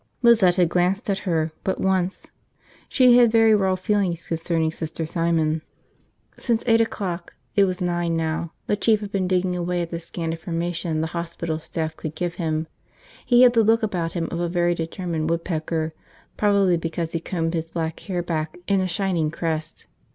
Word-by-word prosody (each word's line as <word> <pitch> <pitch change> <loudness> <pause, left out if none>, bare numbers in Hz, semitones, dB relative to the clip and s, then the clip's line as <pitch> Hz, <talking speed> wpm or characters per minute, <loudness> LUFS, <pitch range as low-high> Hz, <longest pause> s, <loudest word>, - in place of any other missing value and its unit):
Lizette 220 -7 +6
had 180 -2 +4
glanced 185 +6 +1
at 195 - -1
her 160 -1 +1
but 190 - -1
once. 190 -1 -1 0.6
She 250 -2 +6
had 240 -2 +5
very 225 -1 +5
raw 190 -3 +3
feelings 185 -3 0
concerning 165 -1 0
Sister 160 0 -4
Simon. 160 -1 0 0.8
Since 235 -2 0
eight 230 -1 +4
o'clock 185 -6 -3
– - - -43
it 200 -1 +5
was 185 -1 -3
nine 175 -2 0
now 160 0 -2
– - - -45
the - - +1
Chief 215 0 +2
had 205 -1 -6
been 190 -2 0
digging 180 0 +1
away 175 0 -1
at 170 - -7
the 170 - -3
scant 165 0 -4
information 165 -1 -2
the - - 0
hospital 170 -1 -3
staff 160 0 -4
could 155 0 -6
give 175 -1 -2
him. 160 -1 -1 0.6
He 245 0 +6
had 245 -1 +7
the 230 -2 +4
look 225 +2 +3
about 175 -6 -1
him 165 -2 -2
of 170 - -3
a 175 0 -1
very 175 0 +2
determined 165 -1 -3
woodpecker, 160 -1 -2 0.4
probably 200 -4 +3
because 165 0 -3
he 165 - -1
combed 165 -1 -2
his 165 -1 -2
black 165 -1 -3
hair 180 -3 -3
back 160 -2 -3
in 195 -1 +2
a 185 - 0
shining 175 -3 0
crest. 160 -1 -4
175 Hz, 190 wpm, -23 LUFS, 165-190 Hz, 0.8 s, had